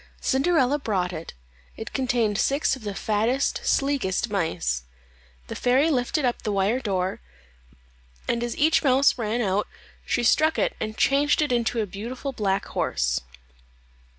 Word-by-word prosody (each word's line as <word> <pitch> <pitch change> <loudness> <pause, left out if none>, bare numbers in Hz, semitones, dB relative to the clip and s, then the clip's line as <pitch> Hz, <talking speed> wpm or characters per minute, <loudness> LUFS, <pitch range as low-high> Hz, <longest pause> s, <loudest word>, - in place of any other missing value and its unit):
Cinderella 280 0 +2
brought 185 -8 -1
it; 165 0 -7 0.4
it 220 - -7
contained 240 -6 0
six 280 0 +1
of 260 - -13
the 205 -2 -4
fattest, 225 +7 0
sleekest 245 -7 0
mice. 165 - -1 0.6
The - - -7
fairy 265 +6 +2
lifted 260 +2 0
up 245 - -1
the 215 - -2
wire 200 +5 +1
door, 190 - -2 1.1
and 235 0 0
as 240 - -3
each 315 +2 +3
mouse 270 -1 +4
ran 225 +1 -1
out 200 +1 0 0.4
she 240 - -1
struck 315 +7 +3
it - - 0
and 215 0 -4
changed 285 +1 +3
it 295 - -2
into 235 -1 +1
a - - -1
beautiful 235 +8 -6
black 195 -4 -1
horse. - - -1
235 Hz, 150 wpm, -25 LUFS, 200-270 Hz, 1.1 s, mouse